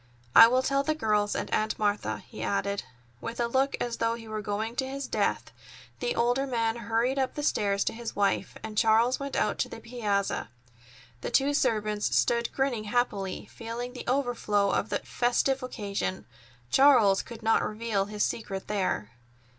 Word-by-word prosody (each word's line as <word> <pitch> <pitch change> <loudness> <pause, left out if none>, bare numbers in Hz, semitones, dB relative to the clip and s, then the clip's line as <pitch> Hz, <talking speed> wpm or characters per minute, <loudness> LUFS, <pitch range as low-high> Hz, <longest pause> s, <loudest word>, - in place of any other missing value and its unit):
I - - +11
will 255 +2 +2
tell 275 0 +2
the 310 +2 0
girls 210 -6 +1
and - - -3
Aunt 215 0 0
Martha," 210 -1 -1
he - - -9
added. 200 0 -1 0.4
With 230 +1 -6
a 240 - +2
look 265 +3 +1
as 240 -1 -2
though 230 0 +1
he 230 -1 -10
were 215 0 -4
going 215 +3 -3
to 265 - 0
his 275 0 -5
death, - - -1 0.5
the 485 - -1
older 245 +4 +1
man 230 -3 0
hurried 235 +4 0
up 260 -1 -1
the 295 - -3
stairs 200 -7 +1
to - - -1
his 230 0 -6
wife, 200 -1 0
and 220 -1 -6
Charles 230 +3 +3
went 280 0 -4
out 210 - 0
to - - 0
the - - -8
piazza. 210 - -2 0.7
The - - -3
two 280 +1 +2
servants 215 -5 +1
stood 235 0 +2
grinning 260 -5 -1
happily, 210 -5 -1
feeling 235 +2 -5
the 250 - -8
overflow 240 -6 +1
of 210 - 0
the - - +1
festive 255 +2 +1
occasion. 200 -6 -3 0.5
Charles 245 -8 +6
could 230 -1 -11
not 225 0 +3
reveal 215 -2 -1
his 210 0 -2
secret 195 -4 -3
there. 185 - -1
230 Hz, 180 wpm, -28 LUFS, 210-250 Hz, 0.7 s, I